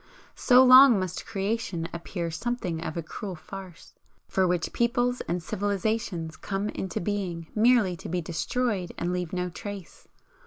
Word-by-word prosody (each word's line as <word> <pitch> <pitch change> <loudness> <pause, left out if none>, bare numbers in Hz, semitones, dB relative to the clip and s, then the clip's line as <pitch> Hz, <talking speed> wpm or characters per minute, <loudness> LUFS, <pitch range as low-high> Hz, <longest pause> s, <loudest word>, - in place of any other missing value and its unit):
So 250 0 +6
long 255 -3 +9
must 185 -1 -4
Creation 200 -5 -2
appear 170 0 -4
something 175 -2 -3
of 160 - -5
a 170 - -2
cruel 185 +4 -6
farce, 185 +2 -11 0.3
for 190 -1 +2
which 175 -2 -1
peoples 245 +1 +1
and 175 0 -2
civilisations 200 -4 -2
come 200 +4 -3
into 190 -3 -4
being 180 -4 -3
merely 220 -4 +4
to - - -8
be 180 +2 -1
destroyed 180 +4 -2
and 175 +1 -1
leave 180 -2 -3
no 180 -1 -2
trace. 200 0 -9
190 Hz, 150 wpm, -27 LUFS, 170-220 Hz, 0.3 s, long